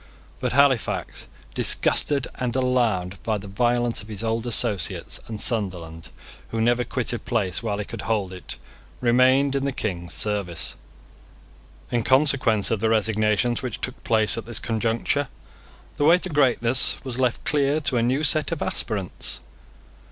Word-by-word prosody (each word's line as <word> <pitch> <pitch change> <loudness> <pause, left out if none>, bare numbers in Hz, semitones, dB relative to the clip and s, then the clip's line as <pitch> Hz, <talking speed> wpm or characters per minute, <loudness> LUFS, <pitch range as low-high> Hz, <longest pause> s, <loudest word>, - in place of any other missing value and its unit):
But - - -2
Halifax, 140 -4 +1 0.3
disgusted 140 -3 +2
and 125 -1 -2
alarmed 120 -8 0
by 110 -2 -1
the 100 0 -9
violence 120 +3 0
of 105 - -12
his 110 0 -5
old 115 +1 -1
associates, 110 - 0
and 110 -2 -6
Sunderland, 90 -9 -2 0.4
who 115 - -4
never 120 +2 +2
quitted 120 -2 -2
place 105 -7 -1
while 105 -3 -2
he 105 - -4
could 115 0 -7
hold 100 -4 -1
it, 90 - -8 0.4
remained 130 +3 +3
in 135 -1 -1
the 140 - 0
King's 90 -9 -4
service. 100 -6 -1 1.2
In 120 -1 +1
consequence 130 -5 +3
of 115 - 0
the 110 +2 +1
resignations 110 +1 +1
which 125 -4 -5
took 130 0 -5
place 110 -2 +2
at 110 - -10
this 120 -2 -2
conjuncture, 115 +5 0 0.7
the 145 - +1
way 165 +3 +7
to 185 - -2
greatness 130 -4 +3
was 130 -2 -5
left 125 -2 0
clear 145 0 +1
to 130 -4 0
a - - +2
new 130 +6 +1
set 155 +2 +3
of 165 - -2
aspirants. 100 -4 -1
115 Hz, 155 wpm, -24 LUFS, 105-130 Hz, 1.2 s, way